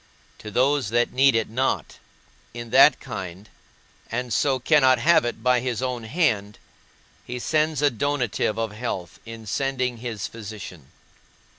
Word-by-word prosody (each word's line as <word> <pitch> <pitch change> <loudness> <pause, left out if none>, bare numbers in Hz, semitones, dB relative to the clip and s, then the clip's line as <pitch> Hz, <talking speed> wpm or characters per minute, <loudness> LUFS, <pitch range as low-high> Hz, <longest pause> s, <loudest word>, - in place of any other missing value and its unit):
To 105 - -8
those 130 +2 +1
that 120 +1 +1
need 135 0 +4
it 115 -1 +1
not, 130 +4 -2 0.6
in 120 -1 -7
that 135 +4 +7
kind, 95 0 -7 0.6
and 120 0 -2
so 135 +2 +2
cannot 130 -1 +4
have 150 +2 +4
it 115 -2 -4
by 125 0 +3
his 120 -2 -3
own 125 -3 -3
hand, 110 - 0 0.7
he 125 - -6
sends 155 +2 0
a 145 - +4
donative 125 -4 -1
of 115 -1 -2
health 105 -6 -5
in 115 -1 -9
sending 125 +2 -1
his 115 -3 -5
physician. 100 - -9
120 Hz, 145 wpm, -24 LUFS, 110-135 Hz, 0.7 s, that